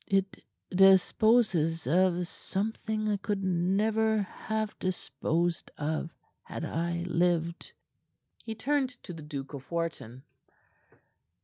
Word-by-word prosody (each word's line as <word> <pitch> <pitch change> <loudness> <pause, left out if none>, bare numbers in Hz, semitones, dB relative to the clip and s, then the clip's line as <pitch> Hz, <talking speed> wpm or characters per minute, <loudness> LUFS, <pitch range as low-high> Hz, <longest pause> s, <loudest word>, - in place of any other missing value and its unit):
It 195 -1 0 0.3
disposes 190 -2 +4
of 180 +4 +2
something 215 +4 -3
I 210 -1 +1
could 200 0 -2
never 210 +4 +2
have 215 +2 -3
disposed 170 -1 -1
of 155 +2 -2 0.3
had - - -6
I 170 +1 -2
lived." 170 -1 0 0.7
He 225 - -5
turned 270 +3 +1
to 175 - -7
the 165 - -9
Duke 145 -2 -6
of 135 -2 -8
Wharton. 160 -7 -4
180 Hz, 105 wpm, -29 LUFS, 165-215 Hz, 0.7 s, disposes